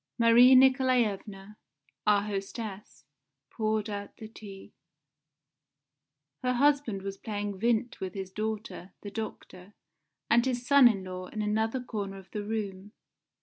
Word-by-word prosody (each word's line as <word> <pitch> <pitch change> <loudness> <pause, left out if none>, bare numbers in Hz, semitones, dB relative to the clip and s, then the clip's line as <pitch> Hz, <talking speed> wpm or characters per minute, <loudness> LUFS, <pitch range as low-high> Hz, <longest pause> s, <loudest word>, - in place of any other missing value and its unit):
Marie 240 +2 +7
Nikolaevna, 235 -6 +2 0.5
our 205 -1 +4
hostess, 195 - -6 0.5
poured 215 -1 -1
out 205 -1 -6
the 220 - -9
tea. 205 -3 -12 1.7
Her 250 0 0
husband 275 -6 +1
was 195 0 -5
playing 205 -3 -4
Vindt 235 +2 0
with 190 0 -5
his 190 -1 -6
daughter, 215 -3 -5
the 205 - -7
doctor, 205 -3 -8 0.5
and 235 +1 +4
his 245 -1 -2
son 280 -1 +7
in 200 -5 0
law 185 0 -7
in 215 +2 -4
another 220 +4 -1
corner 200 -5 -5
of 190 -1 -14
the 210 - -4
room. 205 -2 -5
210 Hz, 130 wpm, -29 LUFS, 195-235 Hz, 1.7 s, Marie